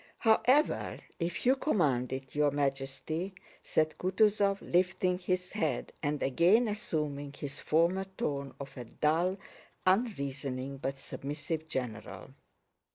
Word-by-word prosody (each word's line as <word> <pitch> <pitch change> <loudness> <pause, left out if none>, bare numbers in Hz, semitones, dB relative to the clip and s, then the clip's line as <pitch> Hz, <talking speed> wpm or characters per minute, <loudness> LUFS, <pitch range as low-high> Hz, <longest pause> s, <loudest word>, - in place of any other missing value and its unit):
"However, 255 +6 +3 0.2
if 170 +4 -2
you 260 +2 +6
command 150 - +1
it, 135 0 -5
Your 150 0 +3
Majesty," 140 +6 -2 0.3
said 155 0 +1
Kutúzov, 200 +1 +3
lifting 180 0 +1
his 180 0 -1
head 155 - -1
and 145 0 -1
again 180 - +4
assuming 150 -10 -2
his 145 +1 -6
former 170 +5 +2
tone 140 -1 -2
of 140 -1 -8
a 125 -3 -6
dull, 165 +9 +1 0.5
unreasoning, 140 - 0
but 135 0 -3
submissive 150 +4 -4
general. 125 -7 -5
155 Hz, 115 wpm, -31 LUFS, 140-185 Hz, 0.5 s, you